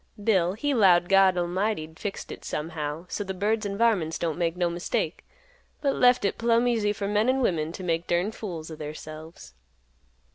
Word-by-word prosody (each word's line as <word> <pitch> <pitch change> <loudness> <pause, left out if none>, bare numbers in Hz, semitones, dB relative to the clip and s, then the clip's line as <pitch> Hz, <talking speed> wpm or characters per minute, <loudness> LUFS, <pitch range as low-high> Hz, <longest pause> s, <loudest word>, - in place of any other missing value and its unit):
Bill 185 -5 +3
he 285 +7 -1
'lowed 180 -7 +4
God 195 -1 +5
'lmighty 180 +1 -1
'd 160 0 -17
fixed 205 -2 -5
hit - - -9
somehow 155 +1 -4
so 205 - -3
th' 190 -1 -6
birds 210 +2 0
an' 200 0 -4
varmints 200 -9 +2
don't 165 -3 -2
make 170 0 0
no 175 -1 +2
mistake, 170 +1 -2 0.6
but 280 -2 +1
left 250 -2 +4
hit 200 - -1
plumb 235 +1 +3
easy 220 -4 +1
for 205 -1 -3
men 210 +4 +2
an' 265 +1 +2
women 165 -8 0
t' 185 - -8
make 165 -1 -1
durned 180 +5 0
fools 170 -8 -6
o' - - -6
theirselves." 155 - -9
185 Hz, 190 wpm, -26 LUFS, 165-215 Hz, 0.6 s, God